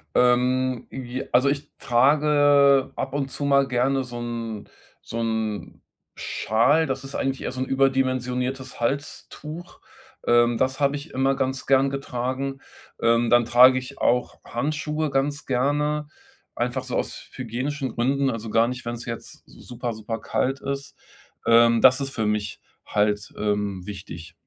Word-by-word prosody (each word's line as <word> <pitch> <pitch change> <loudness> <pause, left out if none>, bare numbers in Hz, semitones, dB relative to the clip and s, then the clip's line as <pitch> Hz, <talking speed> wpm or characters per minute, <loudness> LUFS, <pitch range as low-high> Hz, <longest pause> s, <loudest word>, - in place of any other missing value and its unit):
Ähm, 125 0 +2
j 130 0 -5
also 130 +3 +4
ich 140 +1 -2
trage 140 +1 +4
ab 135 0 -4
und 135 -2 -2
zu 145 - -5
mal 140 -1 +4
gerne 135 +1 +1
so 120 -1 -7
'n 115 -3 -5 0.3
so 115 - -6
'n 110 -2 -3 0.3
Schal, 135 +9 +2
das 135 0 -3
ist 135 - -8
eigentlich 135 0 -1
eher - - -3
so 130 - -6
'n - - +1
überdimensioniertes 130 -1 0
Halstuch. 145 +6 -5 0.5
Ähm, 120 0 +4
das 130 +2 0
habe 140 0 +2
ich 145 +3 -8
immer 135 +1 +1
ganz 130 0 -2
gern 135 0 +4
getragen. 135 0 -3 0.4
Ähm, 115 0 +3
dann 120 -1 +5
trage 125 +2 +7
ich 130 +2 -9
auch 125 +1 +1
Handschuhe 155 +4 -2
ganz 140 +2 -1
gerne, 145 +3 0 0.5
einfach - - -2
so - - -3
aus - - -4
hygienischen 130 +2 -4
Gründen, 135 +3 +1
also 115 -1 -5
gar 115 +2 +3
nicht, 125 0 -5
wenn's 120 0 -5
jetzt 115 -1 -7
super, 120 -1 -6
super 110 +1 -5
kalt 135 +5 -1
ist. 140 0 -5 0.5
Ähm, 115 0 +5
das 130 +1 +6
ist 135 - -3
für 110 -4 -2
mich 105 -1 -2 0.2
halt, 105 0 0
ähm, 105 -2 -1
wichtig. 95 -5 -8
130 Hz, 150 wpm, -24 LUFS, 120-140 Hz, 0.5 s, trage